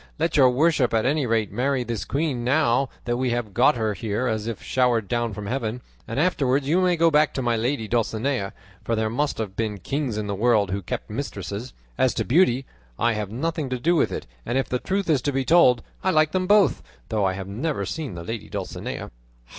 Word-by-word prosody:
Let 165 Hz, +1 st, 0 dB
your 135 Hz, -4 st, +6 dB
worship 135 Hz, -2 st, +2 dB
at 110 Hz, -, +2 dB
any 140 Hz, 0 st, +1 dB
rate 110 Hz, -3 st, +1 dB
marry 130 Hz, +4 st, 0 dB
this 115 Hz, -3 st, -4 dB
queen, 140 Hz, -4 st, -1 dB
now 130 Hz, -1 st, +2 dB, 0.2 s
that 120 Hz, 0 st, 0 dB
we 130 Hz, 0 st, 0 dB
have 120 Hz, -4 st, -2 dB
got 125 Hz, +6 st, +4 dB
her 110 Hz, -2 st, 0 dB
here 105 Hz, +5 st, -2 dB
as 110 Hz, -2 st, -1 dB
if 115 Hz, -3 st, -4 dB
showered 120 Hz, -5 st, +1 dB
down 120 Hz, 0 st, -1 dB
from 105 Hz, 0 st, -6 dB
heaven, 120 Hz, 0 st, -2 dB, 0.3 s
and 115 Hz, -, -3 dB
afterwards 140 Hz, -5 st, +1 dB
you 170 Hz, +5 st, +3 dB
may 180 Hz, -1 st, +3 dB
go 165 Hz, 0 st, +3 dB
back 150 Hz, 0 st, +3 dB
to 130 Hz, -, -1 dB
my 120 Hz, -1 st, +1 dB
lady 115 Hz, 0 st, -1 dB
Dulcinea; 115 Hz, -1 st, -1 dB, 0.3 s
for 115 Hz, -, 0 dB
there 110 Hz, 0 st, 0 dB
must 145 Hz, +5 st, -1 dB
have 105 Hz, -4 st, -4 dB
been 110 Hz, -2 st, -2 dB
kings 130 Hz, -, -2 dB
in 105 Hz, -, -2 dB
the 100 Hz, -, -2 dB
world 105 Hz, -2 st, +2 dB
who 100 Hz, +1 st, -2 dB
kept -, -, -5 dB
mistresses. 110 Hz, +6 st, -5 dB, 0.3 s
As 130 Hz, -2 st, +3 dB
to -, -, -1 dB
beauty, 135 Hz, -3 st, +3 dB, 0.3 s
I 120 Hz, 0 st, +2 dB
have 105 Hz, -2 st, -3 dB
nothing 150 Hz, +5 st, -2 dB
to 125 Hz, -, -1 dB
do 170 Hz, +7 st, +2 dB
with -, -, +2 dB
it; -, -, -4 dB, 0.2 s
and 120 Hz, -, -1 dB
if 135 Hz, -, 0 dB
the 125 Hz, -, -1 dB
truth 195 Hz, +5 st, -1 dB
is 150 Hz, -6 st, +3 dB
to 145 Hz, -, 0 dB
be 135 Hz, -1 st, -1 dB
told, 125 Hz, -8 st, +5 dB, 0.2 s
I 190 Hz, -, +2 dB
like 155 Hz, -3 st, +3 dB
them 185 Hz, -1 st, 0 dB
both; 205 Hz, -1 st, +4 dB, 0.3 s
though 110 Hz, -3 st, 0 dB
I 95 Hz, -1 st, +2 dB
have 95 Hz, 0 st, -6 dB
never 135 Hz, +10 st, -2 dB
seen 150 Hz, -, -4 dB
the 85 Hz, -, -6 dB
lady 115 Hz, +4 st, -6 dB
Dulcinea." -, -, -5 dB
125 Hz, 225 wpm, -24 LUFS, 110-145 Hz, 0.3 s, your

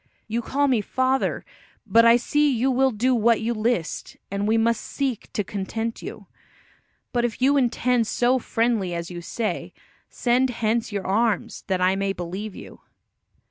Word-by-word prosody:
You 230 Hz, +2 st, -1 dB
call 285 Hz, +4 st, 0 dB
me 250 Hz, -5 st, +2 dB
father, 260 Hz, +5 st, 0 dB, 0.4 s
but 230 Hz, +1 st, +5 dB
I 230 Hz, +1 st, +7 dB
see 295 Hz, +4 st, +2 dB
you 255 Hz, +2 st, +1 dB
will 265 Hz, +1 st, +3 dB
do 250 Hz, +2 st, +1 dB
what 230 Hz, -1 st, +3 dB
you 230 Hz, +2 st, -1 dB
list, 215 Hz, -6 st, -2 dB
and 200 Hz, +1 st, -1 dB
we 225 Hz, +1 st, +3 dB
must 230 Hz, 0 st, +2 dB
seek 270 Hz, -6 st, -3 dB
to 210 Hz, -, 0 dB
content 225 Hz, +4 st, -4 dB
you. -, -, -8 dB, 0.9 s
But 240 Hz, -1 st, +1 dB
if 240 Hz, -2 st, -2 dB
you 270 Hz, +3 st, +4 dB
intend 245 Hz, -3 st, +2 dB
so 250 Hz, +3 st, +2 dB
friendly 225 Hz, -7 st, 0 dB
as 170 Hz, +1 st, -5 dB
you 175 Hz, -1 st, -6 dB
say, 215 Hz, +6 st, -3 dB, 0.4 s
send 250 Hz, +2 st, +1 dB
hence 230 Hz, -1 st, -1 dB
your 200 Hz, -2 st, -3 dB
arms, 215 Hz, 0 st, 0 dB
that 190 Hz, -2 st, 0 dB
I 185 Hz, +1 st, +3 dB
may 195 Hz, 0 st, -1 dB
believe 190 Hz, +4 st, -6 dB
you." -, -, -11 dB
230 Hz, 170 wpm, -24 LUFS, 205-245 Hz, 0.9 s, I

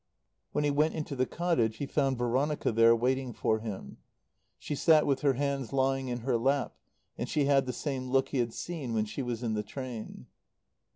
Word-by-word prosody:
When -, -, 0 dB
he 145 Hz, -, +2 dB
went 150 Hz, +3 st, +2 dB
into 155 Hz, -3 st, -4 dB
the 130 Hz, -1 st, +1 dB
cottage 160 Hz, -11 st, 0 dB
he 140 Hz, -, -3 dB
found 135 Hz, -2 st, 0 dB
Veronica 130 Hz, +5 st, 0 dB
there 115 Hz, +1 st, +6 dB
waiting 130 Hz, +1 st, 0 dB
for 110 Hz, 0 st, 0 dB
him. 110 Hz, -3 st, -7 dB, 0.6 s
She -, -, -5 dB
sat 155 Hz, +1 st, +4 dB
with 135 Hz, -2 st, +1 dB
her 140 Hz, -2 st, +3 dB
hands 140 Hz, -2 st, -2 dB
lying 135 Hz, 0 st, +1 dB
in 120 Hz, -1 st, -3 dB
her 120 Hz, 0 st, +1 dB
lap, 135 Hz, 0 st, +1 dB, 0.4 s
and 120 Hz, -, -3 dB
she 150 Hz, -2 st, +1 dB
had 135 Hz, -2 st, +3 dB
the -, -, 0 dB
same 130 Hz, -1 st, -4 dB
look 135 Hz, +1 st, +2 dB
he 135 Hz, -, -1 dB
had 120 Hz, -1 st, 0 dB
seen 140 Hz, -3 st, -4 dB
when 110 Hz, -1 st, +1 dB
she 110 Hz, +6 st, -5 dB
was 120 Hz, -2 st, -3 dB
in 115 Hz, -2 st, -1 dB
the 105 Hz, -, 0 dB
train. 120 Hz, +1 st, -7 dB
130 Hz, 205 wpm, -30 LUFS, 120-140 Hz, 0.6 s, there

